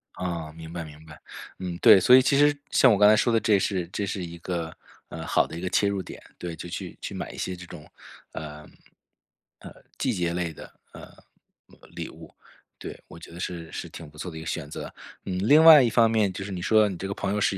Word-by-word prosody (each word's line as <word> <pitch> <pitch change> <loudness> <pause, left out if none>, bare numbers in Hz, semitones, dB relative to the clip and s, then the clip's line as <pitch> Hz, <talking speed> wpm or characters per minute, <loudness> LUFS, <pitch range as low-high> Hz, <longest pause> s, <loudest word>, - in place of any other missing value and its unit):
啊， 85 -3 -4
明 80 0 -11
白 85 -1 -5
明 75 0 -13
白。 75 -1 -14 0.4
嗯， 90 -2 -5
对， 95 - +8
所 125 +7 +6
以 130 - +7
其 135 +2 +2
实 145 0 +4
像 130 - +5
我 105 - +3
刚 105 +1 +6
才 110 - +6
说 120 +2 +2
的 115 - +3
这 105 -2 +3
是 95 -3 -2
这 100 +2 -3
是 95 -1 -4
一 85 0 -9
个， 85 -2 -4 0.4
呃， - - -7
好 - - +2
的 80 - -8
一 - - -7
个 90 - -3
切 100 +2 +2
入 100 -1 -1
点， - - -11 0.2
对， 85 -2 -6
就 85 - -8
去 85 - -7
去 - - -6
买 - - -6
一 - - -12
些 95 - -4
这 90 0 -11
种， 80 -4 -12 0.4
呃， 75 -1 -8 0.9
呃， - - -11 0.3
季 - - -1
节 85 -1 -1
类 85 -1 -2
的， - - -12 0.2
呃， - - -12 0.9
礼 - - -5
物， - - -14 0.4
对， - - -9
我 - - -13
觉 85 - -13
得 85 - -11
是 85 -3 -6
是 - - -6
挺 85 -3 -10
不 75 - -19
错 90 - -6
的 80 - -9
一 - - -7
个 80 - -9
选 75 -2 -4
择。 - - -8 0.3
嗯， 90 -1 -3
另 150 +5 +7
外 160 -3 +10
一 120 - +2
方 115 -1 +3
面 105 -4 +2
就 95 - -6
是 100 - -7
你 90 -2 -5
说 110 +4 +4
到 105 - +3
你 95 - -6
这 95 - -5
个 100 - -3
朋 100 - -3
友 105 - -1
是 100 -1 +1
90 Hz, 275 characters per minute, -25 LUFS, 85-105 Hz, 0.9 s, 外